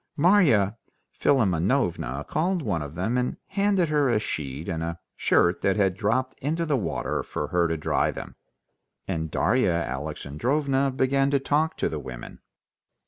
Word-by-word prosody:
Marya 140 - +4 0.3
Philimonovna 90 - +1
called 175 +2 0
one 90 - -1
of 75 +1 -7
them 110 +8 0
and 125 - -2
handed 195 -3 +1
her 145 -3 +2
a 120 - +3
sheet 75 -5 -4
and 80 -1 -2
a 85 +1 -4 0.2
shirt 85 +1 +2
that 95 - +2
had 95 -3 +2
dropped 125 +6 0
into 160 +5 -1
the 150 -3 +1
water 105 -10 -2
for - - -4
her 85 -1 +2
to 80 0 -1
dry 75 - +1
them, - - -7 0.7
and 80 -1 -2
Darya 120 +3 +2
Alexandrovna 125 - -1
began 135 +1 +1
to 140 0 +2
talk 150 +4 0
to - - 0
the 80 - -4
women. 65 -3 -9
110 Hz, 155 wpm, -26 LUFS, -, 0.7 s, Marya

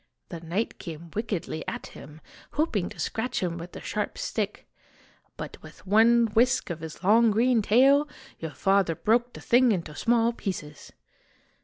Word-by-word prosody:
The 170 - -6
knight 170 +7 -3
came 165 -2 -8
wickedly 200 -7 -3
at - - -4
him, 150 +2 -12 0.3
hoping 260 - 0
to - - -12
scratch 240 -1 -2
him 170 -1 -2
with 175 +2 -9
the - - -8
sharp 210 0 -3
stick; 210 -2 -3 0.7
but - - -8
with - - -14
one 230 +4 +5
whisk 250 -3 +2
of 170 - -5
his 160 +2 -9
long 225 +4 +5
green 230 +2 +3
tail, 270 +8 +4 0.3
your 160 - -4
father 195 0 +2
broke 240 +6 +1
the - - -10
thing 245 0 +4
into 170 -6 -2
small 235 +2 +2
pieces 155 -10 -6
210 Hz, 160 wpm, -26 LUFS, 170-235 Hz, 0.7 s, one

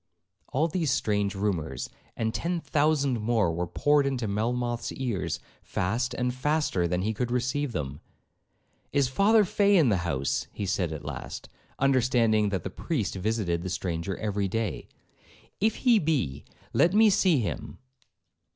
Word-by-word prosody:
All 150 +5 +2
these 165 -2 -1
strange 105 -5 0
rumours, 85 -10 -2 0.3
and 110 0 -1
ten 175 0 -1
thousand 145 -5 +1
more, 105 -6 +2
were 85 +1 -2
poured 145 - +2
into 125 -4 -1
Melmoth's 120 +3 -1
ears, 100 - -2 0.2
fast 120 +8 -1
and 125 0 0
faster 135 - 0
than 90 +1 -1
he 110 +2 0
could 120 +3 -2
receive 130 +3 -1
them. 70 - -4 0.9
'Is 140 -2 +2
Father 205 - +4
Fay 200 +2 +3
in 150 -8 +5
the 100 - +3
house,' 80 -6 -1 0.2
said 95 -2 0
he 80 - -4
at 75 -1 -9
last, 75 -4 -6 0.3
understanding 120 -5 +3
that 95 -2 -2
the 95 - -4
priest 135 - -2
visited 95 -3 -1
the 95 - -4
stranger 90 0 -3
every 100 -2 -1
day; 115 +3 -3 0.7
'if 220 +2 +2
he 240 -4 +4
be, 125 - -1 0.3
let 170 +6 +3
me 215 0 +6
see 185 -5 +4
him.' 115 -5 -3
115 Hz, 150 wpm, -27 LUFS, 95-145 Hz, 0.9 s, me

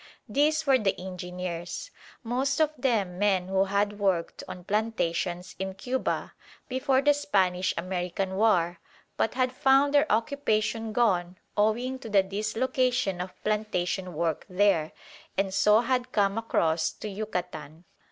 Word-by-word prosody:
These 305 +2 +2
were 270 -2 +5
the 200 -4 0
engineers; 180 -2 -5 0.3
most 265 +4 0
of 310 -1 +3
them 215 -10 0
men 190 -3 +2
who 190 0 +2
had 205 +1 0
worked 190 -4 0
on 180 - -8
plantations 180 -4 -1
in 190 0 -3
Cuba 255 +6 -2 0.3
before 265 +1 +1
the 290 0 +5
Spanish 190 -10 +1
American 180 +2 -2
War 180 -5 +2 0.4
but 225 - 0
had 255 -1 +1
found 270 +1 +3
their 290 +1 +4
occupation 225 -2 0
gone 185 -6 +1 0.2
owing 235 +5 +1
to 230 - -8
the 200 -2 +4
dislocation 215 +1 0
of 185 0 -8
plantation 190 -4 -1
work 165 0 -1
there, 180 -4 +2 0.5
and 195 0 0
so 210 +3 +5
had 250 0 -1
come 200 -2 +2
across 165 -8 +1
to - - -7
Yucatan. 180 -6 -5
205 Hz, 135 wpm, -27 LUFS, 180-245 Hz, 0.5 s, were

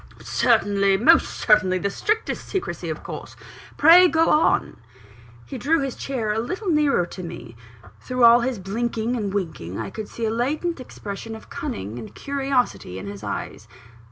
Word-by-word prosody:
"Certainly 200 -4 +2
most 320 +10 +5
certainly 210 -4 +2
the 200 +2 -2
strictest 435 - -2
secrecy 385 - -3
of - - -5
course - - -8 0.4
pray 345 +4 +8
go 325 -1 +2
on." 305 - +2 0.7
He 265 - -7
drew 320 +3 +2
his 270 -2 -3
chair 230 -6 -2
a 220 - -1
little 370 - -3
nearer 300 - +2
to 185 - -9
me. 145 -9 -9 0.4
Through 255 -1 -2
all 235 +1 +8
his 245 0 -1
blinking 225 +4 -2
and 210 -4 -2
winking, 160 - -4
I - - -5
could 215 -2 -6
see 230 - -5
a 220 - 0
latent 295 +8 -1
expression 225 -2 -7
of 220 - -14
cunning 100 +5 -5
and 110 - -10
curiosity 270 - -1
in 95 - -7
his 100 +1 -8
eyes. 105 +1 -5
230 Hz, 165 wpm, -23 LUFS, 195-275 Hz, 0.7 s, pray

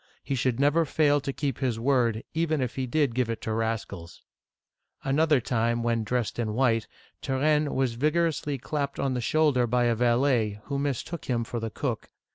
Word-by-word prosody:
He - - -3
should 130 -1 0
never 145 +4 +4
fail 145 -1 +2
to 140 - -3
keep 135 -2 -3
his 125 -4 -1
word, 120 -3 +1
even 160 -1 0
if 125 -2 -2
he 130 -1 -3
did 145 -1 +1
give 125 -1 0
it 115 - -3
to 110 - -2
rascals! 110 -7 -4 0.4
'*. - - -44
Another 150 +1 +3
time, 120 0 0
when 115 -1 +1
dressed 120 +1 -2
in 110 -2 -1
white, 115 -3 +2 0.3
Turenne 150 +2 +1
was 130 -3 +1
vig 150 +7 0
orously 155 -4 0
clapped 140 +1 -3
on 135 -1 0
the 125 - -2
shoulder 140 -2 +2
by 125 +1 +2
a 120 -1 +3
valet, 120 -2 +2
who 140 -1 -3
mistook 145 +4 -3
him 120 -2 0
for 120 +1 -4
the 115 0 -3
cook. 120 0 -4
130 Hz, 195 wpm, -27 LUFS, 115-145 Hz, 0.4 s, never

